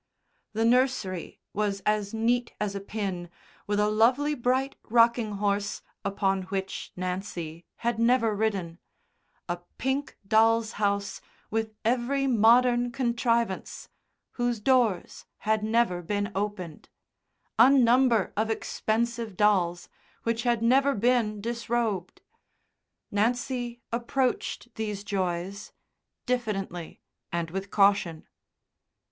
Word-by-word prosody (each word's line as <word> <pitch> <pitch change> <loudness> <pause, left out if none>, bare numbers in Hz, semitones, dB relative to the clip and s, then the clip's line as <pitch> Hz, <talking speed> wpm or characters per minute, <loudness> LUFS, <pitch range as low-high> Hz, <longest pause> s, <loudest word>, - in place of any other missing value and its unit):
The 225 +1 +1
nursery 240 -7 +1
was 200 -1 -1
as 210 0 0
neat 235 +2 0
as 210 -1 -1
a 200 - -3
pin, 195 -4 -4 0.4
with 205 0 0
a 210 - +3
lovely 250 +7 +3
bright 260 +1 0
rocking 230 -1 +3
horse 205 0 -1 0.2
upon 195 -1 0
which 195 -1 -4
Nancy 180 -3 -5
had 235 -1 -2
never 230 -2 +3
ridden; 195 -6 -2 0.7
a 175 0 -2 0.2
pink 265 +2 -2
doll's 225 +1 +4
house 200 -1 0 0.3
with 220 0 -2
every 250 +4 +1
modern 240 0 +4
contrivance, 235 -4 -1 0.4
whose 240 -2 -1
doors 235 -5 +1
had 215 0 0
never 220 -5 +1
been 205 +4 -2
opened; 190 -5 -4 0.7
a 235 +3 +9
number 250 -4 +4
of 220 +2 0
expensive 225 -1 -2
dolls, 180 -5 +2 0.4
which 230 0 0
had 235 -2 +1
never 270 +4 +4
been 220 -2 +1
disrobed. 230 -4 -2 0.9
Nancy 240 +2 -1
approached 245 +1 -1
these 210 -2 -4
joys 190 0 -3 0.5
diffidently 195 -9 -3 0.3
and 170 -1 -2
with 195 +2 -4
caution. 195 -5 +2
220 Hz, 105 wpm, -27 LUFS, 200-240 Hz, 0.9 s, a